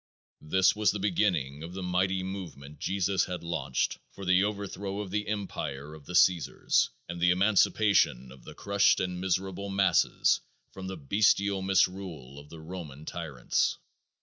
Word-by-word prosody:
This 95 +7 +3
was 105 0 +2
the 105 - 0
beginning 90 -8 0
of 85 +2 -7
the 95 - -5
mighty 95 +1 0
movement 80 -7 -7
Jesus 95 +1 0
had 90 -1 -5
launched 75 -6 -2
for 100 - -10
the 90 +1 +4
overthrow 100 -1 -3
of 100 -3 -5
the 105 +1 -2
empire 75 -9 -4
of 75 -2 -13
the 90 - -5
Caesars 90 -2 +3 0.2
and 85 0 -6
the 90 - +4
emancipation 95 - +3
of 65 - -15
the - - -11
crushed 100 0 +3
and 90 -1 -3
miserable 95 +1 -2
masses 95 -3 +2 0.3
from 95 -1 -8
the 95 0 -5
bestial 100 +5 +2
misrule 90 -7 -1
of 75 +1 -14
the 80 -1 -11
Roman 80 -4 -8
tyrants. 75 -9 -1
90 Hz, 155 wpm, -29 LUFS, 80-100 Hz, 0.3 s, the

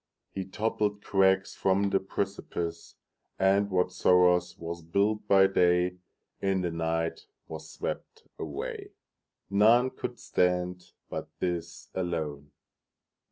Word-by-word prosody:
He 95 -1 -4
toppled 105 +1 -1
crags 95 -1 +3
from 100 +1 +1
the 95 - +3
precipice, 95 -4 -4 0.4
And 100 +1 +3
whatsoe'er 90 -1 +4 0.2
was 85 0 -6
built 100 +6 0
by 95 -1 +6
dayIn 90 -1 +2 0.6
the 85 - -1
night 80 0 -2 0.2
was 80 0 -8
swept - - -6 0.2
away:None 105 - 0
could 125 -1 -5
stand 90 0 0
but - - -5
this 85 -1 -3
alone. 80 -5 -3
90 Hz, 100 wpm, -29 LUFS, 85-100 Hz, 0.6 s, by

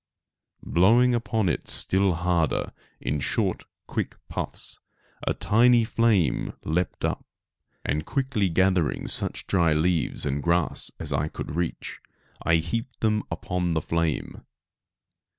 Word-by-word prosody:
Blowing 115 +8 +4
upon 110 -3 0
it 80 - -1
still 95 -1 +2
harder, 85 -3 0 0.3
in 75 - -2
short - - -1 0.2
quick - - -3
puffs, - - -5 0.5
a - - +1
tiny 120 +2 +4
flame 110 - +1
leaped 85 +3 -1
up; - - -2 0.6
and 75 +2 0
quickly 125 - 0
gathering 95 -2 +1
such - - -1
dry 85 -5 +3
leaves 80 +1 +1
and 70 0 -1
grass 85 0 +1
as 75 -3 -4
I 70 +2 0
could 75 - -6
reach, 85 0 -3 0.4
I 85 - +3
heaped 115 - -3
them 105 -1 +2
upon 90 -2 -2
the - - +3
flame. 85 -2 -2
90 Hz, 125 wpm, -26 LUFS, 80-110 Hz, 0.6 s, Blowing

